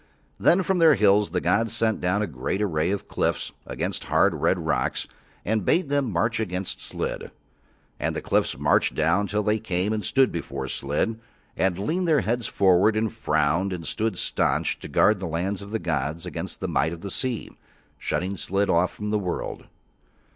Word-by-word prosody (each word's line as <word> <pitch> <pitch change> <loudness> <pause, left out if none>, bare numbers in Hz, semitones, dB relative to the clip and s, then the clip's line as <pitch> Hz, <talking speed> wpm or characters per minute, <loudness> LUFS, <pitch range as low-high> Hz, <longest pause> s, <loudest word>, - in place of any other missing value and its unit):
Then 185 +2 +4
from 190 0 +1
Their 160 -3 +7
hills 105 -2 +4
the 90 +2 -1
gods 105 +6 +1
sent 110 -1 +1
down 95 +4 +1
a - - +1
great 75 +3 -3
array 85 -5 0
of 100 0 -2
cliffs - - -1 0.2
of - - -7 0.2
hard, - - +3
red 95 - +1
rocks, 80 -6 -1 0.4
and 110 0 0
bade 170 - +2
them 140 -5 +1
march 105 +7 0
against 95 -3 -3
Slid. - - -4 0.7
And - - -1
the - - -3
cliffs - - +1
marched - - +2
down 85 +6 +2
till 105 +1 -1
they 105 +1 +1
came 100 -1 -1
and 105 -1 -2
stood 135 -1 +3
before 70 -5 -4
Slid 75 +14 -1 0.4
and 95 -2 +1
leaned 170 - -1
their 155 -3 +4
heads 120 0 -1
forward 100 +3 +3
and 110 0 0
frowned 80 -2 +1
and 85 -3 -5
stood 110 -4 -1
staunch - - 0
to - - -8
guard 105 -1 +3
the 95 - -4
lands 90 +5 -2
of 100 - -9
the 110 - -1
gods 80 -2 -2
against 90 - -6
the - - -1
might 80 +2 +1
of 85 - -9
the 100 - -5
sea, 125 -4 -2 0.5
shutting 95 +3 -2
Slid 100 +2 0
off 85 +2 +3
from 105 0 -5
the 105 - +2
world. 90 -3 -4
100 Hz, 190 wpm, -25 LUFS, 85-110 Hz, 0.7 s, Their